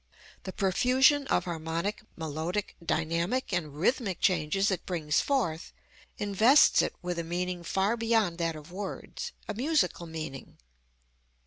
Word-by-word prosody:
The 190 - -4
profusion 255 +9 +3
of - - +2
harmonic, 170 +4 -3
melodic, 160 +5 -3
dynamic 170 +9 -1
and 155 -5 -2
rhythmic 195 - 0
changes 185 +3 +2
it 185 - -3
brings 160 -4 +1
forth 185 - -1 0.4
invests 215 +8 +5
it - - -2
with 175 -1 -2
a - - -2
meaning 175 +1 -3
far 195 +6 +1
beyond 225 -7 +1
that 165 -1 0
of 155 +2 -11
words, 200 - -6 0.2
a - - -2
musical 235 - 0
meaning. 155 -5 -7
180 Hz, 130 wpm, -29 LUFS, 165-215 Hz, 0.4 s, invests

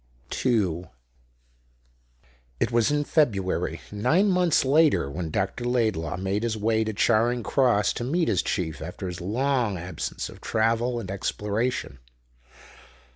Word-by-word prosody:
2 95 -9 0 1.7
It - - 0
was 120 +2 +3
in 145 0 +1
February, 105 - 0
nine 165 - +2
months 180 -6 +3
later, 145 - +3
when 80 +2 -4
Dr. 95 +8 -2
Laidlaw 110 -10 0
made 95 +2 -1
his 115 -1 -1
way 110 +1 +1
to 110 - -2
Charing 115 +3 +2
Cross 120 -7 +2
to - - -4
meet 165 +7 0
his 95 - +2
chief 80 -5 -3
after 90 +4 -6
his 90 0 -5
long 120 +1 0
absence 90 +2 -5
of - - -13
travel 115 +2 +1
and 95 -4 -6
exploration. 105 - -2
110 Hz, 130 wpm, -25 LUFS, 95-125 Hz, 1.7 s, was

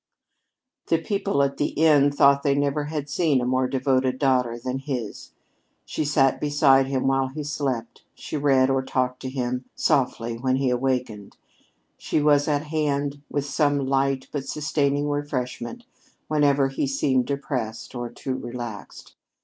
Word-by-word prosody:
The 165 - +3
people 195 -3 0
at 140 0 -1
the 145 - +1
inn 145 -2 +5
thought 140 0 +4
they 140 -1 +2
never 145 +1 0
had 150 -1 -4
seen 145 -2 +1
a 125 - -1
more 130 +1 +1
devoted 130 -1 +1
daughter 125 -4 +1
than 125 +2 -4
his. 130 -6 -5 0.6
She 155 - -3
sat 135 -2 +2
beside 145 -2 +4
him 135 -1 -1
while 135 0 +2
he 150 +3 -6
slept; 140 -5 -3
she - - -7
read 135 -2 +3
or 135 0 +2
talked 130 -1 -1
to 130 - -4
him 125 -1 -3
softly 115 -3 0
when 130 +1 +1
he 130 -1 +1
awakened; 125 -5 -2 0.6
she - - 0
was 145 -1 +3
at 145 -1 +1
hand 145 -2 -1
with 145 -1 -2
some 145 0 +1
light 135 0 0
but 140 -2 -4
sustaining 145 -1 0
refreshment 145 - -4 0.4
whenever 145 -2 +3
he 135 +1 -2
seemed 135 -2 +1
depressed 130 -5 -4
or 120 -1 -4
too 130 +3 -5
relaxed. 120 -5 -7
135 Hz, 155 wpm, -24 LUFS, 130-145 Hz, 0.6 s, inn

